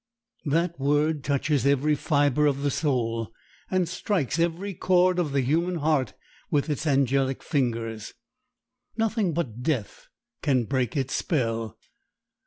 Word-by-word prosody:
That 165 +2 0
word 145 +2 +1
touches 140 -1 +1
every 140 +2 +3
fiber 145 -1 +2
of 140 -1 0
the 145 - +1
soul, 115 -6 -1 0.4
and 185 -2 +1
strikes 170 - -1
every 175 +4 -1
chord 180 0 +3
of 160 -5 0
the 140 0 +2
human 165 +7 +1
heart 150 -6 0 0.3
with 150 +1 +1
its 150 +2 -2
angelic 135 -1 +1
fingers. 115 -5 -2 0.8
Nothing 220 -4 +1
but 130 -8 -3
death 125 -7 -2 0.3
can 130 -4 +2
break 130 +1 -1
its 135 -1 -1
spell. 115 - -1
145 Hz, 130 wpm, -26 LUFS, 130-165 Hz, 0.8 s, every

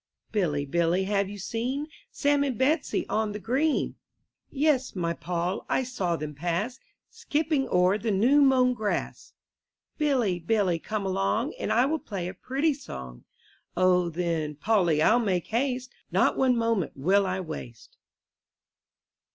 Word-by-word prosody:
Billy, 155 -9 0
Billy, 170 +5 +1
have 200 0 0
you 205 - -7
seen 240 +8 -3 0.2
Sam 285 -8 +1
and 265 -5 -2
Betsy 290 +5 +1
on 215 -1 -1
the 210 - -5
green? 270 +8 0 0.5
Yes, 275 -4 +1
my 170 -2 -1
Poll, 175 +2 -3
I 260 - +1
saw 200 -9 -2
them 150 -1 -5
pass, 175 - -2 0.3
Skipping 310 -10 -1
o'er 180 +3 +3
the 225 - -2
new 240 +9 +4
mown 260 -2 +4
grass. 215 -4 -3 0.7
Billy, 250 -12 +1
Billy, 180 -1 +1
come 215 +3 -3
along, 195 +8 0
And - - -2
I 245 +3 +4
will 315 +3 0
play 190 -9 -5
a 180 - -5
pretty 275 - 0
song. 65 - -9 0.5
then, 170 -4 +1
Polly 170 -3 +2
I'll 230 +7 +5
make 190 -7 0
haste; 255 +2 -1 0.2
Not - - +3
one 255 -2 +3
moment 230 -6 0
will 190 +8 +2
I 185 0 -1
waste. 155 -9 -8
210 Hz, 145 wpm, -27 LUFS, 175-260 Hz, 0.7 s, I'll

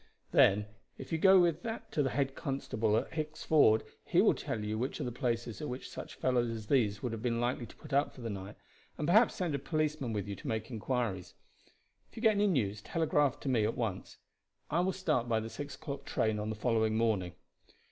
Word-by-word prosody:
Then 105 +2 +5 0.3
if 135 - -9
you 165 - 0
go 190 +2 +7
with 170 -2 +2
that 225 0 -6
to 155 - +1
the 135 - +1
head 135 +1 0
constable 110 -6 -1
at - - -2
Hicks 155 -1 -4
Ford 125 -8 +5 0.2
he - - +2
will - - +6
tell 110 - -4
you 105 +1 -2
which 130 +3 -2
are - - -2
the 125 - -3
places 120 -1 -2
at 150 - -3
which 125 +1 -5
such - - -8
fellows 125 -2 +1
as 110 -2 -5
these 105 -5 +1
would 125 - -1
have 115 -1 -5
been 115 -1 0
likely 120 0 -1
to - - -15
put 150 -2 -11
up 140 +2 +3
for 130 - -13
the 115 - -4
night, 100 +1 -7 0.4
and 150 - -2
perhaps 215 +7 +5
send 175 -5 -1
a 140 - -1
policeman 155 -3 -1
with 105 -2 -3
you 100 - -4
to - - -9
make 110 +2 -3
inquiries. 115 -5 -2 0.7
If - - -22
you 225 - -6
get 220 - +7
any 205 0 +2
news 105 - 0
telegraph 150 -1 +1
to 140 - -2
me 120 -4 +3
at 110 +2 -1
once. 110 -6 -3 0.5
I 165 - +2
will 185 +2 +2
start 155 -11 0
by 110 -1 +2
the 110 +1 -6
six 145 0 -6
o'clock 140 -3 -6
train 110 -1 0
on 105 +1 -3
the 110 - -3
following 110 0 +1
morning. 105 -6 +1
125 Hz, 230 wpm, -32 LUFS, 110-150 Hz, 0.7 s, go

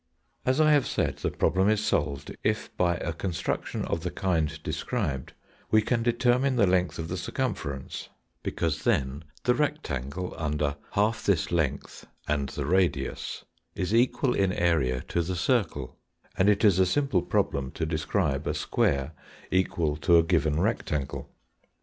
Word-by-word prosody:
As 130 +3 +3
I 155 -1 +5
have 145 -3 +4
said, - - -1
the - - -1
problem 95 +2 +2
is 110 0 +1
solved, 70 -2 -1
if, - - -1
by 85 -1 +2
a 85 - -3
construction 85 0 -3
of 85 - -2
the 90 - -2
kind 85 -6 0
described, 75 - -2 0.4
we 110 0 +4
can 120 +1 +1
determine 125 +3 +2
the 115 -4 +4
length 90 -1 +1
of 80 - -4
the 90 - -3
circumference; 90 - -4 0.3
because 80 -3 -2
then 65 +2 0 0.2
the 125 - +4
rectangle 90 - -2
under 75 -2 0 0.2
half 105 +2 +1
this 95 -5 +1
length 75 -5 -2 0.2
and 70 -2 0
the 70 +1 -4
radius 90 +3 0 0.3
is 95 +3 -2
equal 125 +2 +3
in 95 -1 +2
area 75 -8 +1
to 85 - +1
the 90 +2 -2
circle, 90 - 0 0.4
and 95 +2 +4
it 105 +1 +3
is 95 -3 +5
a 95 - +6
simple 135 -5 +2
problem 70 -5 0
to 80 - -2
describe 80 -2 -1
a - - 0
square 70 +2 0 0.4
equal 85 -5 +1
to 85 +3 +4
a 85 - +6
given 80 -3 +1
rectangle. 70 - -1
85 Hz, 155 wpm, -27 LUFS, 75-105 Hz, 0.4 s, a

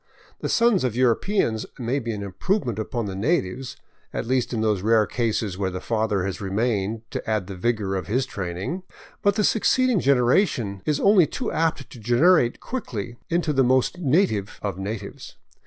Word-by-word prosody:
The - - -3
sons 230 - +3
of 125 -3 -1
Europeans 120 - +1
may 125 +3 -1
be 120 -3 -4
an 105 -2 -4
improvement 115 - -1
upon 115 +1 -3
the 100 - -4
natives, 125 - -1 0.3
at - - -3
least 130 0 0
in 115 -3 -1
those 105 -4 +1
rare 110 +1 +4
cases 110 -4 -2
where 95 -2 0
the 95 0 -5
father 110 -2 0
has 100 +2 -4
remained 105 +1 -1
to - - -4
add 110 -4 0
the 100 - -7
vigor 100 0 -1
of 95 - -3
his 125 +5 +1
training; 95 - -4 0.4
but 200 0 +3
the 215 - +1
succeeding 245 +2 +3
genera 135 +4 +4
tion 100 - -5
is 150 -2 +1
only 195 -5 +5
too 250 - -4
apt 160 -3 0
to 125 - -11
degenerate 120 - +3
quickly 120 - -5
into 170 -2 +1
the 135 -1 +3
most 130 +7 +2
native 135 - +1
of 100 -3 -3
natives. 100 0 -6
120 Hz, 180 wpm, -24 LUFS, 100-150 Hz, 0.4 s, only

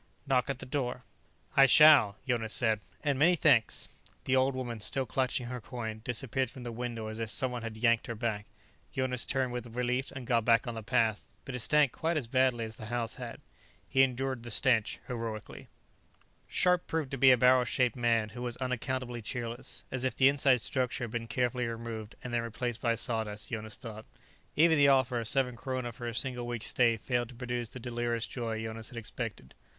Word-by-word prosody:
Knock 135 -1 +1
at 135 - -1
the - - -8
door." 125 -2 -3 0.5
"I 135 0 +8
shall," 135 -7 +7
Jonas 115 -3 0
said, 110 -3 +2 0.2
"and 140 -2 0
many 175 +4 +5
thanks." 140 -9 +3 0.4
The 130 - +1
old 130 +1 +2
woman, 120 -3 -4
still 135 +5 -1
clutching 130 +1 -1
her 125 0 -5
coin, 110 -3 -6
disappeared 130 +1 -1
from 125 +1 -10
the 120 - -5
window 115 -1 -4
as 110 +1 -6
if 115 -1 -3
someone 125 +1 0
had 115 -1 -6
yanked 115 0 +2
her 115 - -4
back. 105 -2 -3 0.4
Jonas 130 -2 0
turned 130 -2 0
with 120 -1 -6
relief 125 +2 -1
and 130 -2 -7
got 115 -2 +2
back 115 +1 +4
on 120 - -4
the 110 - -5
path, 115 -2 +1 0.2
but 135 - -6
it 125 - -3
stank 145 +2 +3
quite 165 0 -1
as 140 - -1
badly 125 -1 +2
as 110 0 -8
the 110 - -8
house 120 0 -3
had. 120 -2 -7 0.5
He 135 - +3
endured 130 -1 0
the 120 - -8
stench 115 -2 +2
heroically. 115 -3 -6 0.8
Scharpe 180 -1 +2
proved 160 -4 -2
to 135 - -3
be 135 - +7
a 125 - +7
barrel 125 +1 +5
shaped 125 0 +1
man 115 -3 +1
who 120 +3 -9
was 120 -1 -4
unaccountably 125 -1 -3
cheerless, 120 +2 -5
as 130 -1 -3
if 130 -3 0
the 135 0 +6
inside 135 -3 +3
structure 130 0 -1
had 120 - -4
been 115 -1 -4
carefully 125 0 0
removed, 115 -2 -6
and 125 - -6
then 120 - +1
replaced 115 0 -4
by 115 -1 +2
sawdust, 110 -3 -3
Jonas 110 -2 -4
thought. 110 -2 -9 0.5
Even 160 0 +5
the 140 - +6
offer 130 -3 +3
of 115 - -3
seven 130 -1 +2
kroner 130 -1 -4
for 120 +1 -7
a 115 - -4
single 125 0 0
week's 120 -2 -4
stay 115 -2 +3
failed 120 +3 -1
to 125 - -12
produce 120 -1 -4
the 130 - -8
delirious 120 -1 -2
joy 115 -3 -4
Jonas 110 0 -5
had 120 - -10
expected. 115 - -6
120 Hz, 205 wpm, -30 LUFS, 115-130 Hz, 0.8 s, I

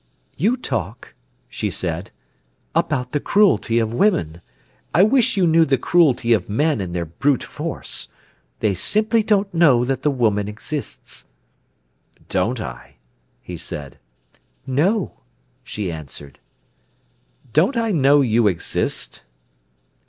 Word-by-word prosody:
"You 220 - +1
talk," 110 - -4 0.3
she - - -3
said, 85 +1 -3 0.6
"about 125 -5 0
the 145 - 0
cruelty 195 - +3
of 115 -1 0
women; 85 - +1 0.5
I 175 - +7
wish 225 -1 +3
you 185 - +4
knew 165 0 +5
the 135 -4 +2
cruelty 130 -6 +3
of 110 - 0
men 145 +3 +1
in 90 -2 -5
their 85 -1 -2
brute 130 - 0
force. - - -4 0.5
They 105 -2 +2
simply 215 - +2
don't 205 -2 +1
know 145 -8 +4
that 130 0 -1
the 150 - +2
woman 110 -7 +1
exists." 135 +8 -5 1.0
"Don't 110 +7 0
I?" 60 - -8 0.5
he - - -7
said. 70 -3 -6 0.7
"No," 170 - 0 0.4
she 100 -5 -4
answered. 75 -3 -8 1.1
"Don't 190 - +3
I 230 -1 +1
know 145 -4 +4
you 115 -3 +3
exist?" 90 -4 -1
130 Hz, 125 wpm, -21 LUFS, -, 1.1 s, I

